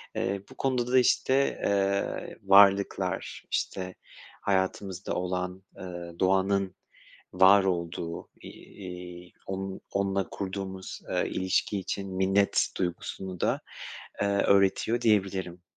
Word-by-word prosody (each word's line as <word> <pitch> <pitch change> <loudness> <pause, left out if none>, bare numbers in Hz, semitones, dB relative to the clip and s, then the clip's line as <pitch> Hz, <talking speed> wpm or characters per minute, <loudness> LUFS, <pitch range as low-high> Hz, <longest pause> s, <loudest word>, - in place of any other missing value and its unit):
Iıı, 100 0 -1
bu - - -13
konuda 125 -2 0
da, 130 - +6
işte, 135 +2 +2
ııı, 100 0 0
varlıklar, 100 -1 +4
işte 95 -1 -2 0.5
hayatımızda 95 -1 -1
olan, 90 +1 -3
ııı, 85 -2 -8
doğanın 95 0 +2 0.6
var 95 +2 +7
olduğu, 85 -2 -3
iii, 90 -2 -10
onun 95 0 -4
onunla 100 -1 0
kurduğumuz, 95 -1 -5
ııı, - - +1
ilişki 95 +2 0
için 95 0 -4
minnet 95 +1 +3
duygusunu 90 +1 -4
da, - - +1 0.6
ııı, 100 0 +1
öğretiyor 100 +4 +3
diyebilirim. 95 -5 +1
95 Hz, 105 wpm, -28 LUFS, 90-100 Hz, 0.6 s, var